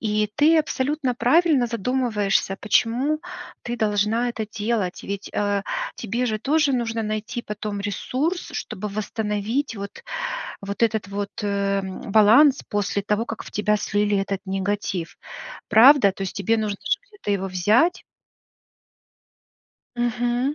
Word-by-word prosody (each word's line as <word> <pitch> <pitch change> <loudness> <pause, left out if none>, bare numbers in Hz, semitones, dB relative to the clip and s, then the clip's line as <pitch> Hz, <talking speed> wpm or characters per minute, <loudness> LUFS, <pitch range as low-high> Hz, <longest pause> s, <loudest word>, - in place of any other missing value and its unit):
И 210 -1 0
ты 315 +2 +5
абсолютно 285 -2 -1
правильно 275 +1 +3
задумываешься, 220 -4 0
почему 250 +8 +1 0.4
ты 240 0 -4
должна 220 +2 +1
это 220 -2 -4
делать, 210 -4 -1
ведь, 200 0 -5
э, 205 -1 0 0.3
тебе 235 +3 -2
же 215 -2 -1
тоже 290 +3 +2
нужно 230 -2 -1
найти 215 +3 -3
потом 210 -1 -5
ресурс, 265 - -2
чтобы 210 +2 -5
восстановить 215 +4 -2
вот 200 0 -8 0.6
вот 200 +3 -5
этот 220 -3 +1
вот, 200 0 -3
э, 200 -1 0
м, 190 -1 -6
баланс 235 +7 +6
после 205 -1 -1
того, 210 +2 0
как 225 - -6
в - - -10
тебя 210 0 +1
слили 205 0 0
этот 195 0 -2
негатив. 195 -2 -2 0.5
Правда? 230 -1 +7
То 195 - -6
есть 190 - -5
тебе 215 +3 +1
нужно 210 -2 -2
же 485 - 0
где-то 410 - -5
его 195 -1 -1
взять? 210 - +2 1.9
Мгм. 240 +3 0
215 Hz, 135 wpm, -23 LUFS, 200-245 Hz, 1.9 s, Правда